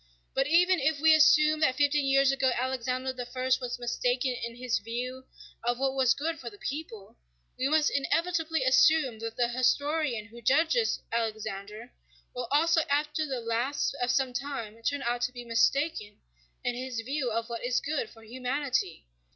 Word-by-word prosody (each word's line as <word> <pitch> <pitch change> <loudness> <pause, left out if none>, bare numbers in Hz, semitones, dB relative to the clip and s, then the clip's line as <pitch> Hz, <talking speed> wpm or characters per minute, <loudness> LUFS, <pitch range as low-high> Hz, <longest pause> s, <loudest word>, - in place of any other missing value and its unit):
But 270 +1 +1
even 355 +3 +4
if 285 +2 +1
we 320 +1 +6
assume 305 0 +5
that 260 -5 +2
fifty 290 +1 +2
years 275 -1 +3
ago 270 -1 +1
Alexander 255 +1 -2
I 245 +1 -5 0.2
was 245 -1 -4
mistaken 245 +1 -1
in 235 -1 -6
his 245 -1 -1
view 250 +4 -5 0.4
of 240 +1 0
what 270 0 0
was 265 -2 +3
good 325 +2 -3
for 240 - -6
the 205 - -15
people, 230 -7 -7 0.4
we 260 +2 -1
must 310 0 +3
inevitably 325 +2 0
assume 260 -1 +4
that 225 0 -5
the 240 -1 +2
historian 255 -1 0
who 235 +2 -13
judges 320 - +2
Alexander 220 0 -4 0.4
will 245 -1 -4
also 325 +3 +3
after 300 +2 0
the 260 -3 -3
lapse 235 +6 -1
of 245 - 0
some 260 -1 +1
time 245 -4 -5
turn 285 +4 -1
out 240 0 -1
to 245 +1 0
be 245 -1 -9
mistaken 235 -1 0 0.5
in 245 - 0
his 250 -1 -5
view 265 +2 -2
of 230 0 -2
what 235 -1 -6
is 245 +1 +1
good 280 -5 -3
for 225 - -17
humanity. 255 - -2
255 Hz, 170 wpm, -28 LUFS, 235-290 Hz, 0.5 s, we